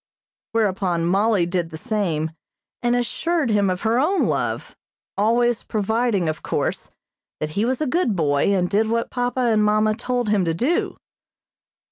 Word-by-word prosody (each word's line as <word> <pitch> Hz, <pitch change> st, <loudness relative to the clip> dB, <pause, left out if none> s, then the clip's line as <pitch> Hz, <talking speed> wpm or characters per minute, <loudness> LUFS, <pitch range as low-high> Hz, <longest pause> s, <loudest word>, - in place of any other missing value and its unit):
Whereupon 190 Hz, -6 st, 0 dB
Mollie 195 Hz, +1 st, +2 dB
did 175 Hz, -1 st, -2 dB
the 160 Hz, -, -8 dB
same, 160 Hz, -5 st, -1 dB, 0.5 s
and 240 Hz, 0 st, +2 dB
assured 285 Hz, +3 st, 0 dB
him 205 Hz, -2 st, +2 dB
of 185 Hz, 0 st, -2 dB
her 225 Hz, +2 st, +2 dB
own 365 Hz, +8 st, +2 dB
love, -, -, -2 dB, 0.4 s
always 235 Hz, +3 st, +2 dB
providing, 220 Hz, -3 st, 0 dB
of 155 Hz, 0 st, -3 dB
course, -, -, -2 dB, 0.5 s
that 155 Hz, 0 st, -3 dB
he 205 Hz, +7 st, 0 dB
was 260 Hz, +4 st, -1 dB
a -, -, +1 dB
good 295 Hz, -, +1 dB
boy, 145 Hz, -4 st, +1 dB
and 190 Hz, -3 st, +2 dB
did 210 Hz, +4 st, +1 dB
what 230 Hz, +1 st, -1 dB
papa 245 Hz, +1 st, -1 dB
and 225 Hz, -3 st, +3 dB
mamma 215 Hz, +1 st, +3 dB
told 245 Hz, 0 st, -2 dB
him 205 Hz, -3 st, +2 dB
to 165 Hz, -1 st, 0 dB
do. 275 Hz, -, 0 dB
215 Hz, 160 wpm, -22 LUFS, 180-240 Hz, 0.5 s, and